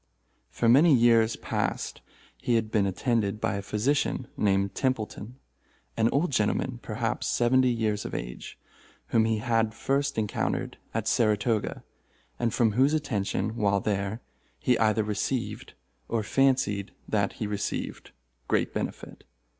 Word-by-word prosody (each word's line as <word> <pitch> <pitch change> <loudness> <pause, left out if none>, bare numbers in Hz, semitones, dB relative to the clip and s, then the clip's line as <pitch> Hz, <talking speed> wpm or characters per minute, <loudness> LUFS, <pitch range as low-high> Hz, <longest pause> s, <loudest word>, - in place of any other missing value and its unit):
For 115 - -1
many 140 +6 +7
years 115 -1 +4
past - - -3 0.3
he 120 - 0
had 110 -1 0
been 100 -3 +2
attended 105 0 0
by - - 0
a - - -3
physician, 115 +5 0
named 100 -1 +1
Templeton—an 115 -1 -3
old 150 +3 +1
gentleman, 120 +2 0
perhaps 115 0 -2
seventy 130 +2 +3
years 110 -3 0
of - - -5
age—whom - - -4
he 110 -1 +1
had 115 -1 0
first 140 +2 0
encountered 105 -2 -2
at - - -2
Saratoga, 110 0 +1 0.6
and 120 -1 +1
from 115 -2 +2
whose 135 +7 +3
attention, 110 -7 -1
while 100 -3 +2
there, 100 +2 -2 0.4
he 125 - +2
either 110 -1 +3
received, 110 +4 -3 0.3
or 115 -2 -1
fancied 110 -5 +1
that 100 -2 0
he 110 - -4
received, 105 -1 -4 0.4
great - - +1
benefit. - - -5
110 Hz, 130 wpm, -27 LUFS, 105-125 Hz, 0.6 s, many